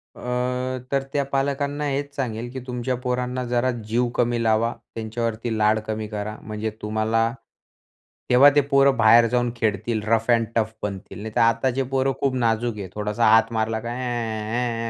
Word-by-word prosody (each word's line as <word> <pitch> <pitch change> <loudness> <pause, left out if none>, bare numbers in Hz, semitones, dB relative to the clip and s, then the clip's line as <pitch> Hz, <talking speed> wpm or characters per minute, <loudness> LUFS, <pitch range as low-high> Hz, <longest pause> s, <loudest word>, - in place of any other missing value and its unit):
अ, - - -13 0.7
तर 135 -1 +1
त्या 145 - +1
पालकांना 140 +1 -1
हेच 140 +1 -3
सांगेल, 120 -3 -3
की 130 - -5
तुमच्या 125 +1 -2
पोरांना 125 0 -1
जरा 120 +1 +1 0.2
जीव 120 +3 +1
कमी 120 -1 +1
लावा, 115 +1 +2 0.2
त्यांच्यावरती 115 0 -3
लाड 110 +1 +3
कमी 110 0 -3
करा. 105 0 -5
म्हणजे 110 0 -4
तुम्हाला 110 +2 +1 1.0
तेव्हा 130 +3 +8
ते 145 - +6
पोरं 140 -1 +3
बाहेर 115 +1 +7
जाऊन 120 0 0
खेळतील 110 0 -1
रफ 115 +1 +1
एंड 115 -1 +4
टफ 110 -1 +1
बनतील. 100 -1 -5
नाहीतर 110 0 -1
आताचे 120 +3 +2
पोरं 135 0 +1
खूप 135 -2 0
नाजूक 115 -2 0
आहे. 100 -2 -5
थोडासा 105 +2 0
हात 115 +1 +5
मारला 110 0 0
काय? 120 +2 -5
ऍ 115 -1 -2
115 Hz, 160 wpm, -23 LUFS, 110-125 Hz, 1.0 s, तेव्हा